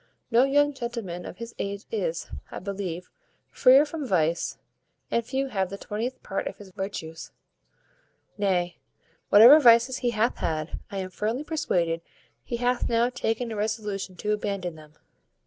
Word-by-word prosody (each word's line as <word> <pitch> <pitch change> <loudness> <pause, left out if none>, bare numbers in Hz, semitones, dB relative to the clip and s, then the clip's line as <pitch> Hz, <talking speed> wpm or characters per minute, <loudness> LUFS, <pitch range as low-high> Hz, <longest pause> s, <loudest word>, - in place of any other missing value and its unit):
No 240 +3 +5
young 290 +1 +3
gentleman 235 -9 -5
of - - -9
his 230 0 -8
age 200 +1 -4
is, 485 +2 -2 0.2
I - - -7
believe, 185 -3 -5 0.4
freer 270 +3 +6
from 300 -2 -5
vice, 170 -4 +1 0.5
and 235 - +1
few 265 +3 -2
have 190 -5 -1
the 200 - -6
twentieth 225 +6 -4
part 195 - -3
of - - -6
his 200 -2 -13
virtues; 180 -4 -6 1.0
nay, 180 -4 0 0.5
whatever 235 +9 +9
vices 245 0 +6
he 245 - 0
hath 230 +1 +1
had, 155 0 -3
I 200 - -6
am 185 -1 -4
firmly 220 +9 -2
persuaded 170 - 0 0.4
he 235 - -4
hath 245 +1 0
now 235 +1 +2
taken 230 -1 -2
a - - -4
resolution 210 -3 -3
to 210 +4 -2
abandon 200 -4 -3
them." 155 -1 -15
215 Hz, 155 wpm, -26 LUFS, 185-245 Hz, 1.0 s, whatever